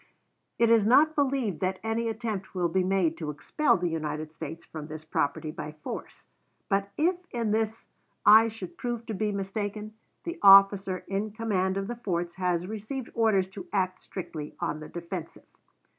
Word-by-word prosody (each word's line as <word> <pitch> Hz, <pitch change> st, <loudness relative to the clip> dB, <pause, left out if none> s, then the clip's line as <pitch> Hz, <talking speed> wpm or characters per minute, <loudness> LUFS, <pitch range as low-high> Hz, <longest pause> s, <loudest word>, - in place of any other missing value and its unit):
It 230 Hz, -1 st, +4 dB
is 225 Hz, -2 st, +6 dB
not 285 Hz, +8 st, +5 dB
believed 265 Hz, -, 0 dB
that 185 Hz, +2 st, -1 dB
any 225 Hz, +1 st, 0 dB
attempt 220 Hz, -4 st, -4 dB
will 175 Hz, -2 st, +1 dB
be 185 Hz, +2 st, +1 dB
made 185 Hz, -3 st, +1 dB
to 155 Hz, -3 st, -4 dB
expel 290 Hz, -, +1 dB
the 175 Hz, -, -1 dB
United 155 Hz, -1 st, -3 dB
States 160 Hz, +1 st, -7 dB
from 155 Hz, -2 st, -8 dB
this 155 Hz, 0 st, -8 dB
property 155 Hz, 0 st, -1 dB
by 150 Hz, 0 st, -6 dB
force; -, -, -7 dB, 0.4 s
but 195 Hz, 0 st, +1 dB
if 345 Hz, +4 st, +2 dB
in 230 Hz, -3 st, -1 dB
this 220 Hz, +1 st, -1 dB, 0.4 s
I 220 Hz, +2 st, +8 dB
should 230 Hz, +10 st, -8 dB
prove 240 Hz, -2 st, -3 dB
to 225 Hz, -, -4 dB
be 210 Hz, +1 st, -1 dB
mistaken, 205 Hz, +2 st, -4 dB, 0.3 s
the 340 Hz, +1 st, -5 dB
officer 195 Hz, -1 st, +7 dB
in 200 Hz, +2 st, -2 dB
command 195 Hz, -4 st, 0 dB
of 195 Hz, -, -1 dB
the 240 Hz, +4 st, -4 dB
forts 175 Hz, -6 st, -2 dB
has 180 Hz, -2 st, 0 dB
received 220 Hz, +5 st, -5 dB
orders 215 Hz, -5 st, +3 dB
to 190 Hz, -1 st, -9 dB
act 185 Hz, -2 st, 0 dB
strictly 160 Hz, -5 st, -7 dB
on 150 Hz, -, -2 dB
the 155 Hz, -, -9 dB
defensive. 170 Hz, -1 st, -7 dB
195 Hz, 175 wpm, -28 LUFS, 175-225 Hz, 0.4 s, I